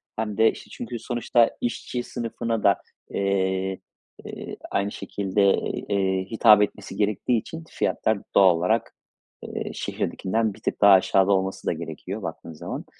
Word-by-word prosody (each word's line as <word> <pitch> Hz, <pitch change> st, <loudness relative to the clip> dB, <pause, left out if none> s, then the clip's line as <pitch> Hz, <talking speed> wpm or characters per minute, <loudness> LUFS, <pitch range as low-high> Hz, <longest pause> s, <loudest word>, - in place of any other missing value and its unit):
hem 110 Hz, -2 st, -3 dB
de, 110 Hz, 0 st, +5 dB
işte, -, -, -13 dB
çünkü 120 Hz, 0 st, -6 dB
sonuçta 120 Hz, 0 st, +2 dB
işçi 120 Hz, +1 st, -3 dB
sınıfına 115 Hz, -2 st, -3 dB
da, 100 Hz, -, +5 dB, 0.3 s
eee, 95 Hz, -1 st, 0 dB, 0.5 s
eee, -, -, -7 dB
aynı 100 Hz, +1 st, 0 dB
şekilde, 100 Hz, -1 st, -2 dB
ııı, 95 Hz, -, +3 dB, 0.3 s
eee, 95 Hz, -2 st, +1 dB
hitap 110 Hz, -2 st, +6 dB
etmesi 105 Hz, 0 st, -2 dB
gerektiği 105 Hz, +3 st, +1 dB
için, 160 Hz, +9 st, -8 dB
fiyatlar, 110 Hz, -2 st, 0 dB, 0.2 s
doğal 95 Hz, -3 st, +7 dB
olarak, 110 Hz, +7 st, 0 dB, 0.5 s
eee, -, -, -5 dB
şehirdekinden 110 Hz, +2 st, -1 dB
bir -, -, -16 dB
tık -, -, -3 dB
daha 100 Hz, -1 st, +8 dB
aşağıda 95 Hz, +1 st, +4 dB
olması 95 Hz, 0 st, 0 dB
da -, -, +2 dB
gerekiyor, -, -, -6 dB
baktığın 85 Hz, -, -7 dB
zaman. 80 Hz, -, -6 dB
100 Hz, 150 wpm, -25 LUFS, 95-115 Hz, 0.5 s, daha